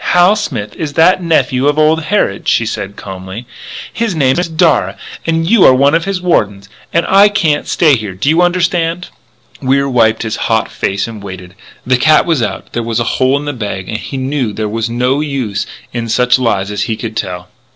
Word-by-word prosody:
"Hal 180 +4 +5
Smith 115 - -4
is 150 -3 -4
that 180 +5 +4
nephew 145 -5 +1
of 145 +1 +1
old 155 +1 +2
Harrod," 155 - 0
she 115 - +2
said 100 -2 -5
calmly. 95 +4 -8 0.5
"His 225 -5 -2
name 135 0 +2
is 175 -1 -1
Darragh. 160 0 +2 0.3
And 165 0 0
you 220 0 +5
are 130 - +7
one 140 +3 +3
of 165 0 +1
his 195 -2 -2
wardens.... 105 - 0 0.2
And 170 - +1
I 200 +2 +6
can't 165 -8 0
stay 155 -5 +3
here. 105 -5 -5
Do 95 - -3
you 160 +4 +4
understand?" 175 -1 0 0.5
Wier 140 +1 +1
wiped 115 -4 +2
his 110 -1 -3
hot 110 0 +1
face 100 +1 -2
and 110 -3 -9
waited. 95 -2 -9 0.3
The 125 0 +2
cat 155 +5 +4
was 165 -7 +1
out; - - -4
there 120 - -1
was 115 0 -2
a - - +1 0.2
hole 130 +2 +3
in 145 - -5
the 145 - -3
bag; 100 -6 -5
and 110 - -3
he 135 - -6
knew 130 -4 -2
there 110 +1 -3
was 115 +2 -2
no 125 +4 0
use 130 -9 -3 0.3
in 115 -1 -3
such 125 +2 +3
lies 105 -5 0
as 105 -1 -3
he 110 - -1
could 115 -2 -6
tell. 90 -3 -4
130 Hz, 210 wpm, -14 LUFS, 110-165 Hz, 0.5 s, are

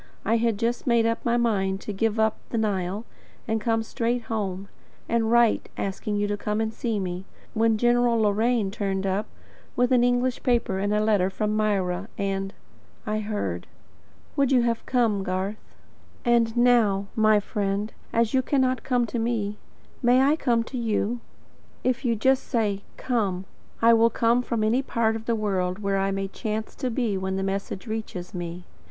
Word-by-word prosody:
I 225 +3 +3
had 230 -2 +1
just 235 +4 -1
made 235 -2 +4
up 230 0 0
my 240 0 +2
mind 195 -5 +1
to 210 - -5
give 220 +2 0
up 220 0 +2
the 230 - -2
Nile, 200 -1 -1 0.4
and 220 0 0
to - - -12
come 225 -1 +1
straight 235 +2 -1
home, 200 -4 -3 0.4
and 230 -1 +1
write 235 -1 +3
asking 200 +2 -2
you 205 0 +1
to 205 0 -1
come 210 +1 -2
and 220 0 -1
see 225 -2 -2
me; 180 0 -4 0.3
when 225 0 +3
General 240 0 +3
Loraine 215 0 +2
turned 195 -2 -2
up, 195 +3 0 0.5
with 245 +1 +2
an 245 -1 +5
English 245 0 +1
paper 235 -7 +1
and 205 +1 0
a 210 - +2
letter 205 -4 +3
from 210 +2 -1
Myra, 200 -3 0
and 195 -1 -2 0.5
I 215 0 -1
heard. 205 - -3 0.7
Would 275 -1 +2
you 250 -3 +5
have 230 -1 0
come, 230 -6 +2
Garth? 190 +3 -4 0.5
And 235 -1 +3
now, 230 -5 +4
my 215 -1 +5
friend, 205 +1 -2 0.2
as 230 -1 +1
you 260 - +4
cannot 260 -2 +1
come 245 -2 +1
to 235 +1 -3
me, 220 -3 -1 0.4
may 250 +1 +5
I 285 +3 +4
come 235 -7 +1
to 250 +2 -6
you? 230 +1 0 0.6
If 255 +1 0
you 235 -3 +2
just 260 +5 +2
say: 210 -5 0 0.2
"COME," 200 -7 -1 0.4
I 230 0 +7
will 230 0 +5
come 235 +1 +2
from 235 -3 -1
any 230 +5 +2
part 230 -4 0
of 225 0 -6
the 235 - +1
world 190 -4 -1
where 200 -1 0
I 195 0 +1
may 195 0 -2
chance 215 +2 -4
to 255 - -1
be 225 -5 -1
when 190 0 -2
the 195 - -1
message 195 +1 -3
reaches 220 -5 -5
me. 175 0 -6
220 Hz, 185 wpm, -25 LUFS, 200-235 Hz, 0.7 s, I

